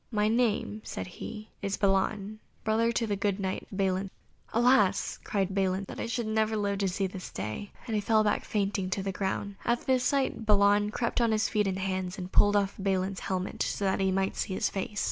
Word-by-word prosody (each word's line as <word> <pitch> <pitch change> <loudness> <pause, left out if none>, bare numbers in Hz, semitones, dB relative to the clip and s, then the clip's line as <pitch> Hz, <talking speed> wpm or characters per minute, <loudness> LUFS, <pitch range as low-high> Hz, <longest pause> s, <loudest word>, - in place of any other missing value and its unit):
"My 210 -2 +1
name," 220 -2 +1
said - - -5
he, 215 +4 -8
"is 200 0 -1
Balan, 200 +2 +1 0.2
brother 225 +2 +2
to 235 0 0
the 205 -2 -1
good 200 0 0
Knight 190 -1 -3
Balin." 190 -1 0 0.4
"Alas!" 230 -5 +3
cried 195 -2 -1
Balin, 190 0 +1
"that - - -8
I - - -2
should 235 -1 -2
ever 220 0 +1
live 200 -1 0
to 195 - +1
see 190 +1 -1
this 185 -1 -6
day," 110 - -5
and 230 - -4
he 210 - +1
fell 215 +1 +3
back 210 - +1
fainting 195 -2 -1
to 190 +1 -1
the 195 - -1
ground. 195 +1 -3
At 235 0 0
this 260 -1 +2
sight 265 -2 +1
Balan 205 -1 +4
crept 235 +2 -1
on 230 -1 +3
his 220 0 +2
feet 210 -2 +1
and 190 -1 -1
hands, 190 0 -2
and 185 -1 -6
pulled 205 0 +5
off 200 -1 +2
Balin's 190 0 0
helmet, 185 0 -3
so 200 - -1
that 190 - +1
he 190 -1 +2
might 190 +1 0
see 190 - -2
his - - +1
face. 205 +1 -3
200 Hz, 215 wpm, -29 LUFS, 190-215 Hz, 0.4 s, pulled